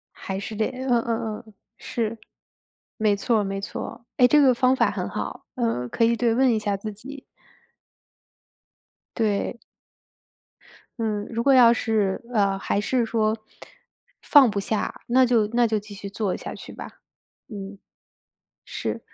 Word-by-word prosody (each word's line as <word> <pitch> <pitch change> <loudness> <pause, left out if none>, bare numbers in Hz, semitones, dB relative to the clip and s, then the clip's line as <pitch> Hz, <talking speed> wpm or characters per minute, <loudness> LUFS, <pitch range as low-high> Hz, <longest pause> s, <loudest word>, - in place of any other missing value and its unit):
还 190 0 -5
是 215 +1 -6
得 215 +1 +1
嗯 260 0 -5
嗯 225 -2 -2
嗯， 215 - -17 0.2
是。 230 -2 -3 0.8
没 215 -2 +3
错 220 +2 +1
儿 - - +1
没 195 0 -3
错 - - -5
儿， 235 - -12 0.2
哎， 250 - +7
这 295 +4 +5
个 260 -3 +6
方 255 +1 +3
法 - - +3
很 - - -3
好， - - -5
嗯， 230 - -1
可 230 - 0
以 235 +1 +4
对， 235 -1 +1
问 255 +1 +3
一 225 - +2
下 210 -2 -1
自 215 +2 -5
己。 265 +7 -10 2.0
对。 220 +2 0 1.4
嗯， 210 -2 -1
如 230 0 -2
果 275 +1 +5
要 245 -3 +8
是， 215 -4 0
呃， 200 -3 +2
还 200 +1 -1
是 245 +2 +1
说 220 -1 0 0.9
放 280 -5 +7
不 205 -1 -2
下， 210 +2 -3
那 255 +2 +5
就 235 -3 +3
那 240 -1 +4
就 220 - 0
继 210 0 -8
续 200 0 -7
做 200 -2 -2
下 - - -7
去 - - -10
吧。 - - -8 0.6
嗯。 200 -2 -8 0.9
是， - - -3
225 Hz, 170 characters per minute, -24 LUFS, 205-240 Hz, 2.0 s, 要